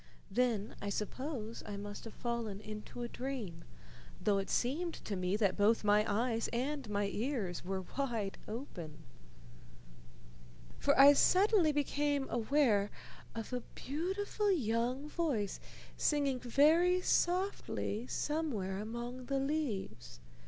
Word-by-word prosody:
Then 225 -1 +1
I 205 - -2
suppose 230 +2 -4
I 205 -1 -4
must 205 +2 -7
have 225 - -9
fallen 235 -4 -3
into 215 +3 -7
a - - -2
dream, 235 -11 -5 0.6
though 200 -2 +2
it 195 - -4
seemed 320 +8 0
to 205 - -5
me 185 +1 0
that 200 -3 +2
both 215 +3 +3
my 210 0 +5
eyes 230 +2 +1
and 265 +1 -2
my 205 0 +1
ears 205 - -2
were 190 +1 -3
wide 230 -8 -2
open, 180 - -7 1.8
for - - +3
I 280 +1 +10
suddenly 370 +1 +5
became 290 -1 0
aware 225 -4 +3 0.5
of 225 +2 -5
a 250 - -1
beautiful 385 +8 -1
young 250 - 0
voice 285 - -1 0.4
singing 280 -4 +2
very 320 +9 +4
softly 350 - 0
somewhere 245 -14 -1
among 240 +4 -5
the 275 - 0
leaves. 220 - -2
240 Hz, 125 wpm, -34 LUFS, 205-290 Hz, 1.8 s, I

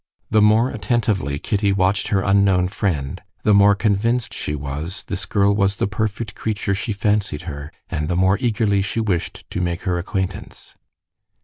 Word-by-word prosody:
The 110 -1 +4
more 110 +4 +4
attentively 105 - 0
Kitty 100 +5 0
watched 100 +1 +1
her 95 -2 +1
unknown 95 -2 +3
friend, 80 -9 -2 0.2
the 105 - +4
more 100 0 +6
convinced 115 +3 0
she 75 - -3
was 75 +5 -5
this - - -4
girl 100 0 +3
was 100 -1 +1
the - - 0
perfect 105 +2 -3
creature 105 -2 -2
she 105 +3 -2
fancied 100 -6 0
her, 75 -3 -7 0.2
and 75 0 -3
the 90 - -1
more 95 +2 +3
eagerly 110 -5 +1
she 100 +4 -2
wished 100 -7 -2
to 90 - -2
make 85 -1 -2
her 90 -3 0
acquaintance. 95 +1 -5
100 Hz, 170 wpm, -21 LUFS, 90-105 Hz, 0.2 s, more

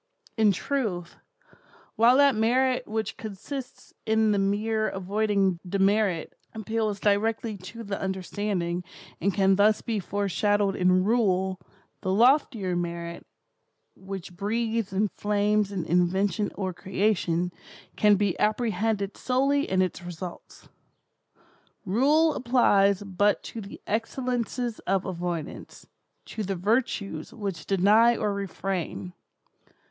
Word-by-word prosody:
In 220 -2 +4
truth, 190 -6 -3 0.8
while 240 +3 +5
that 280 -1 +6
merit 250 +3 +1
which 220 +1 -3
consists 235 +6 -8
in 220 0 +2
the 205 - +2
mere 215 +2 0
avoiding 195 -1 0
demerit, 195 -1 +1 0.2
appeals 220 -1 -2
directly 215 +2 +1
to 230 +5 -9
the 200 -2 -4
understanding, 190 -2 -2 0.4
and 200 +4 +2
can 195 0 +3
thus 210 +1 +3
be 225 -3 -1
foreshadowed 205 +1 0
in 185 0 +3
Rule, 190 -4 +1 0.4
the 185 - -1
loftier 225 -4 +3
merit, 170 -1 -4 0.7
which 190 -2 -8
breathes 225 +1 -1
and 200 +1 0
flames 210 0 +1
in 185 -4 -3
invention 185 +3 +1
or 190 -2 -3
creation, 180 -2 0 0.4
can 210 -1 +5
be 200 -2 +1
apprehended 215 -2 0
solely 275 +3 +1
in 185 0 +3
its 185 - -3
results. 175 0 -9 1.2
Rule 290 - +3
applies 205 -6 +3
but 205 +1 +1
to 225 - -7
the 200 - -10
excellences 240 +1 -2
of 195 0 +1
avoidance—to 175 +4 -7
the 195 -1 -2
virtues 200 -4 -1
which 200 -6 -5
deny 210 +5 +4
or 210 -1 0
refrain. 190 -2 -4
205 Hz, 110 wpm, -26 LUFS, 185-220 Hz, 1.2 s, that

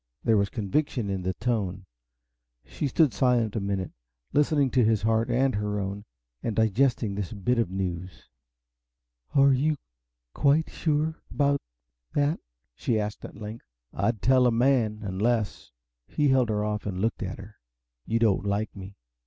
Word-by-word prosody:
There 115 - +3
was 100 0 +2
conviction 115 0 -1
in 95 -1 -2
the 95 0 -2
tone. 100 -5 -2 0.8
She 145 - -3
stood 140 -1 +3
silent 120 -1 +2
a - - +1
minute, 100 -2 -2 0.4
listening 145 -3 +3
to 125 - +4
his 110 -2 +2
heart 110 +2 +2
and 130 +2 +2
her 105 0 -1
own, 100 +1 -4 0.4
and 115 - -2
digesting 110 0 +2
this 100 -2 -4
bit 115 +4 0
of 115 - +1
news. 90 -1 -4 1.1
"Are 140 0 +6
you 150 +4 +1 0.6
quite 150 +3 +2
sure 155 0 -1
about 140 -1 +1 0.5
that?" 145 +2 +2 0.3
she 110 - 0
asked 105 0 -4
at - - -10
length. 110 +2 -8 0.3
"I'd 115 -4 -1
tell 130 0 +5
a - - +3
man! 115 -3 +2
Unless" 105 - -1 0.4
he 145 -1 +1
held 130 -3 +3
her 105 -1 0
off 105 0 -2
and 90 -2 -3
looked 115 +4 -1
at 95 -2 -4
her 105 +1 -12 0.5
"you 115 - +1
don't 110 -5 +2
like 100 +1 -1
me. 95 0 -10
110 Hz, 160 wpm, -27 LUFS, 100-130 Hz, 1.1 s, Are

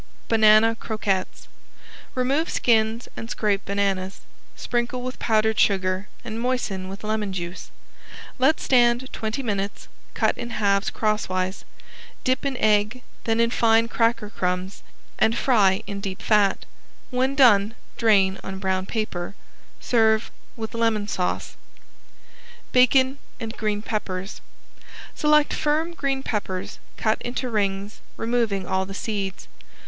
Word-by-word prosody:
~BANANA 220 0 +5
CROQUETTES~ 200 -4 -2 0.7
Remove 270 +6 +1
skins 225 0 +2
and 225 - -7
scrape 205 -4 0
bananas. 195 -1 -1 0.3
Sprinkle 245 +1 -2
with 255 0 -5
powdered 220 -1 +2
sugar 190 0 +2 0.2
and 225 -1 -4
moisten 235 -7 -1
with 195 +2 -8
lemon 215 -2 -1
juice. 175 -1 -6 0.7
Let 275 +5 +4
stand 245 0 +3
twenty 220 +5 -3
minutes; 200 -3 -3 0.3
cut - - +2
in 235 - -4
halves 200 -1 +2
crosswise. 190 -3 -1 0.6
Dip 255 +2 +1
in 270 -2 -3
egg, 215 +3 +2 0.2
then 225 0 +1
in 230 0 +3
fine 230 -1 +3
cracker 230 -2 0
crumbs 180 +1 -2 0.4
and 220 +1 +3
fry 200 -8 +3
in 200 -1 -5
deep 190 -1 -5
fat. 205 -3 +3 0.5
When 260 +2 +1
done 225 -5 +5 0.2
drain 195 -4 +3
on 190 0 -5
brown 190 -1 -1
paper. 200 -5 -3 0.4
Serve 220 -2 +2 0.2
with 220 0 -6
lemon 225 -3 +1
sauce. 180 -3 -2 1.2
~BACON 260 +2 +4 0.2
AND 225 -2 -5
GREEN 210 -1 -2
PEPPERS~ 195 -3 -4 0.7
Select 300 0 +3
firm 310 +3 0
green 275 -4 -1
peppers, 190 -6 -3 0.2
cut 220 0 0
into 245 +1 -3
rings, 200 -1 -1 0.2
removing 225 -5 0
all 190 +1 -1
the 195 - -7
seeds. 200 -3 -4
220 Hz, 125 wpm, -24 LUFS, 195-240 Hz, 1.2 s, ~BANANA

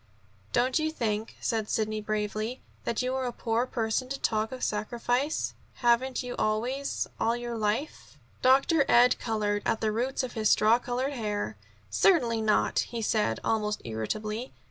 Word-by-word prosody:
"Don't 255 +5 +2
you 310 0 +1
think," 220 -7 -2
said 220 -2 -1
Sidney 215 -1 0
bravely, 215 +3 -2 0.3
"that 235 +1 0
you 255 +1 -1
are 260 -1 -1
a - - -2
poor 230 +1 -1
person 230 +2 -1
to 275 - -3
talk 220 0 0
of 255 -1 -6
sacrifice? 245 +7 -1 0.2
Haven't 245 +2 +2
you 245 0 -5
always, 245 +6 0
all 230 +1 +2
your 240 -1 -4
life 220 +7 -2
" - - -32
Dr. 275 +4 +5
Ed 245 +1 +6
colored 210 -2 -1
to - - +2
the 220 -1 +1
roots 250 +5 -1
of 255 - -4
his 220 -2 +1
straw 220 +3 +5
colored 250 +3 -2
hair. 210 -5 -2 0.4
"Certainly 240 - +3
not," 215 -1 +2
he 230 -1 -2
said 210 - +1
almost 210 -1 0
irritably. 215 - -3
230 Hz, 165 wpm, -28 LUFS, 215-255 Hz, 0.4 s, Ed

